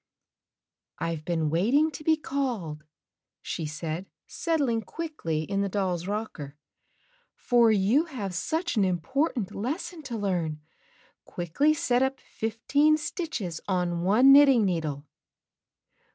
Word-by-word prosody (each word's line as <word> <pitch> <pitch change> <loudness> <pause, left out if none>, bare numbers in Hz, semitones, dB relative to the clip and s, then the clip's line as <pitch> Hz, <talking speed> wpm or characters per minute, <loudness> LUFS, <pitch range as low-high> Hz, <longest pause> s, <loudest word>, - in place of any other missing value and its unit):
"I've 165 -2 -3
been 160 -3 0
waiting 255 - +3
to 305 - -9
be 315 0 +3
called," 230 - -3 0.6
she 160 -3 -4
said 160 +4 -5 0.2
set 330 -2 -1
thng 235 -5 0
quickly 300 - -3
in 195 +4 -1
the 200 - 0
doll's 185 -3 -1
rocker, 190 -9 -5 0.8
"for 240 -2 +3
you 215 - +3
have 225 - -5
such 320 - -2
an 205 - +4
important 210 - -1
lesson 315 - -4
to 235 - -3
learn. 175 -7 -1 0.7
Quickly 230 - +1
set 245 -4 +1
up 265 0 0
fifteen 280 +8 +1
stitches 295 - -4
on 180 -3 0
one 220 +9 +6
knitting 275 -6 +7
needle." 155 -6 -2
210 Hz, 125 wpm, -27 LUFS, 175-280 Hz, 0.8 s, knitting